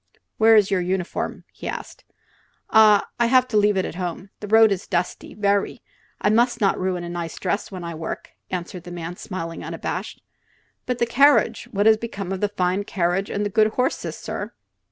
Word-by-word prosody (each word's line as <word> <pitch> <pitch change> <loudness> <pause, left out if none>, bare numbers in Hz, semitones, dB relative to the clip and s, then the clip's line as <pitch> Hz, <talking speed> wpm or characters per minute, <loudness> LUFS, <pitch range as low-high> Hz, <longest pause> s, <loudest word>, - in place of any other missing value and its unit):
"Where's 220 -2 +5
your 190 -2 +2
uniform?" 180 0 -3
he - - -8
asked. - - -7 0.7
"Ah, 215 -2 +6
I 235 - +4
have 255 -1 +3
leave 210 -1 +3
it 185 - -1
home. 180 +2 -5
The 210 - -7
road 220 0 +6
is 195 -1 -2
dusty, 175 -1 -3
very; 200 -1 0 0.4
I 210 - +2
must 235 +2 +2
not 200 -3 +2
ruin 185 -1 -1
a - - -5
nice 170 -2 -5
dress 200 +3 -2
when 185 -2 -7
I 170 0 -5
work," 160 0 -6 0.2
answered 180 -1 -5
the 175 - -8
man, 175 0 -6
smiling 165 -3 -6
unabashed. - - -5 0.6
"But 250 -1 -1
the 235 - +2
carriage. 245 -1 +4
What 205 +1 0
has 220 0 +6
become 200 -4 -5
of 190 - -3
the 205 - +1
fine 185 0 0
carriage 190 -1 -1
and 205 +1 -2
the 205 - -2
good 215 +1 +4
horses, 255 +1 -1
sir?" - - -6
200 Hz, 185 wpm, -23 LUFS, 180-220 Hz, 0.7 s, Ah